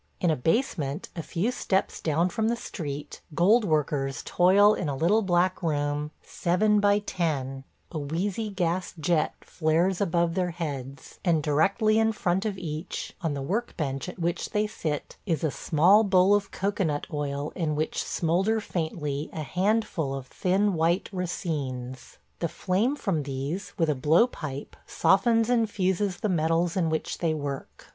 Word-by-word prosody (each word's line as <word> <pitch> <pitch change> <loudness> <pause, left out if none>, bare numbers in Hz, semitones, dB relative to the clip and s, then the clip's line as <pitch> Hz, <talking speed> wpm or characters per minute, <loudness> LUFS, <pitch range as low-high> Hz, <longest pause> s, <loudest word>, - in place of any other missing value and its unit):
In 175 - +2
a - - +2
basement, 155 - -1
a 170 - -3
few 180 +9 -1
steps 195 -6 -1
down 165 +3 +1
from 220 +4 -1
the 235 - +1
street, 150 -10 -6
gold 210 +8 +5
workers 145 - 0
toil 200 +4 +5
in 165 - -2
a 140 - -2
little 180 +10 +3
black 185 -1 +1
room, 145 -2 -1
seven 210 +4 +2
by 205 0 +4
ten; 140 -9 -2 0.3
a 160 - -3
wheezy 185 +9 -2
gas 180 -2 -1
jet 160 -1 +1
flares 175 +4 +1
above 170 -3 +1
their 180 0 0
heads, 140 -6 -6
and 165 -4 +2
directly 200 +9 +3
in 225 0 +3
front 190 0 0
of 200 -2 -3
each, 160 -2 -5
on 160 -5 -1
the 140 - -4
work 220 - -2
bench 135 0 -2
at 180 - -9
which 170 0 -2
they 210 -1 +1
sit, 155 -8 -4
is 165 -5 0
a 155 - +1
small 180 +11 +4
bowl 190 -1 +4
of 205 -1 +1
cocoanut 190 -7 -1
oil 145 0 -2
in 160 -4 -1
which 155 +1 -1
smoulder 190 +7 +1
faintly 155 -6 -3
a 155 - -4
handful 185 -5 0
of 135 -2 -6
thin 190 +8 +1
white 170 +2 +1
racines. 135 -9 -4 0.2
The 170 - 0
flame 210 - 0
from 195 - -1
these, 140 +7 -4
with 165 -4 +2
a 150 - +2
blowpipe, 150 - +1
softens 225 +3 +3
and 235 -3 +2
fuses 190 -1 0
the 215 - +1
metals 165 -1 +1
in 175 -4 +1
which 160 0 -2
they 165 -2 +1
work. 140 -2 -6
170 Hz, 165 wpm, -27 LUFS, 150-195 Hz, 0.3 s, gold